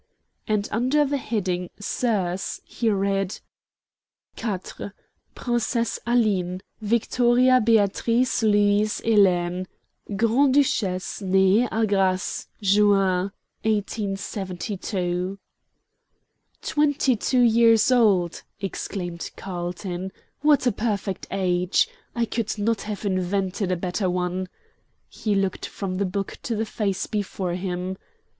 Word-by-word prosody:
And 210 -1 0
under 260 +7 +2
the 285 0 0
heading 185 -7 -2
"Soeurs" 200 -4 -1
he 230 - -1
read: 195 -1 0 1.0
"4. 210 -5 -2 0.8
Psse 240 -1 -1
Aline. 195 -7 +1 0.2
Victoria 240 +3 +3
Beatrix 230 +3 +2
Louise 205 0 +3
Helene, 185 -4 +2 0.4
Alt. 200 - -3
Gr. 230 +6 +4
Duc. 220 -10 +1
Nee 190 +4 +4
a 225 0 +2
Grasse, 190 -2 0 0.2
Juin, 195 -2 +3 0.3
1872." 195 -3 -2 1.3
"Twenty 290 -3 +2
two 250 +3 +1
years 230 0 +5
old," 200 -9 +3 0.2
exclaimed 180 -3 -4
Carlton. 180 0 -5 0.3
"What 295 -2 +4
a 245 - +4
perfect 205 -3 -2
age! 180 - +1 0.3
I 235 -1 +1
could 225 -1 -2
not 215 +1 0
have 210 0 -5
invented 190 0 -1
a - - +2
better 180 +2 -1
one." 180 +1 -2 0.6
He 210 -2 -2
looked 195 -1 -1
from 185 -2 -4
the 200 - +1
book 195 +1 -4
to 235 - -2
the 220 +1 -1
face 200 -3 -2
before 195 -3 -3
him. 180 0 -3
200 Hz, 105 wpm, -24 LUFS, 185-225 Hz, 1.3 s, years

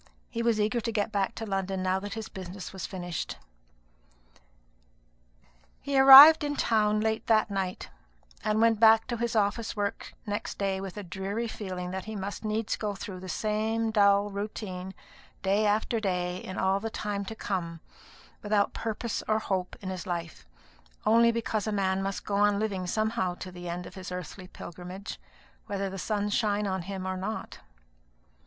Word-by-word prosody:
He 230 - -2
was 230 -2 +2
eager 215 +3 +1
to 230 - -2
get 215 0 -1
back 200 -3 -1
to 225 - -5
London 195 -2 -2
now 185 0 +1
that 205 +1 -6
his 220 -1 -5
business 190 0 -8
was 190 - -5
finished. 175 -3 -5 2.4
He 280 - -3
arrived 275 +4 +11
in 290 0 -1
town 215 -4 +2
late 220 0 -1
that 220 -2 +3
night; 190 -2 -3 0.6
and 215 0 +1
went 225 -1 +4
back 225 0 +6
to 240 - -1
his 235 0 -2
office 215 +2 0
work 205 -1 -3
next 205 +1 -4
day 195 -1 -1
with 195 0 -7
a 205 - -5
dreary 195 +6 -3
feeling 185 -5 -5
that 190 0 -5
he 220 0 -6
must 200 +2 -5
needs 215 0 -1
go 210 -2 -3
through 190 -1 -7
the 185 0 -8
same 220 +3 0
dull 200 -1 +4
routine 195 -2 -5 0.5
day 200 +2 +2
after 215 +2 +1
day 180 -3 -1
in 185 0 -7
all 190 +1 +2
the 225 +2 -4
time 205 -2 -3
to 220 - -6
come, 170 -6 -3 0.6
without 205 -1 +1
purpose 225 0 -3
or 215 - +3
hope 190 -4 -2
in 190 - -5
his 185 -1 -6
life, 170 -2 -5 0.6
only 230 +2 +5
because 225 -2 -2
a - - 0
man 190 -2 +1
must 195 0 -3
go 200 - -1
on 205 0 +4
living 200 -4 -2
somehow 215 -2 0
to 185 - -8
the 175 -1 -7
end 175 +1 -4
of - - -10
his 185 -2 -8
earthly 180 +1 -7
pilgrimage, 180 +3 -8 0.5
whether 195 -1 -2
the 195 - -6
sun 205 +1 -1
shine 210 0 +1
upon 190 -2 -1
him 190 +1 -5
or 185 0 -2
not. 205 +4 -5
205 Hz, 175 wpm, -28 LUFS, 190-220 Hz, 2.4 s, arrived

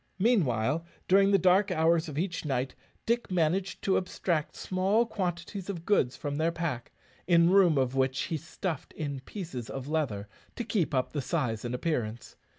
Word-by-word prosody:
Meanwhile, 165 - +2 0.2
during 195 +1 +5
the 200 - +5
dark 190 +2 +4
hours 160 +1 +2
of 145 - -7
each 170 +1 -2
night, 130 -3 -1 0.3
Dick 235 +1 0
managed 180 +2 0
to 195 - +3
abstract 175 -3 -1
small 195 +5 +1
quantities 185 -2 -4
of 170 -4 -5
goods 135 -12 +2
from 145 -1 -3
their 160 +2 +2
pack, 165 -8 -3 0.4
in 170 0 +5
room 185 -6 +5
of 130 -1 +1
which 130 0 +1
he 160 - -2
stuffed 165 0 -5
in 140 -3 -4
pieces 135 - -7
of 135 0 -5
leather 140 -10 -1 0.3
to 240 - -3
keep 195 -10 0
up 130 - 0
the 145 - -1
size 130 -8 -1
and 120 0 -2
appearance. 120 -6 -3
165 Hz, 170 wpm, -29 LUFS, 135-185 Hz, 0.4 s, during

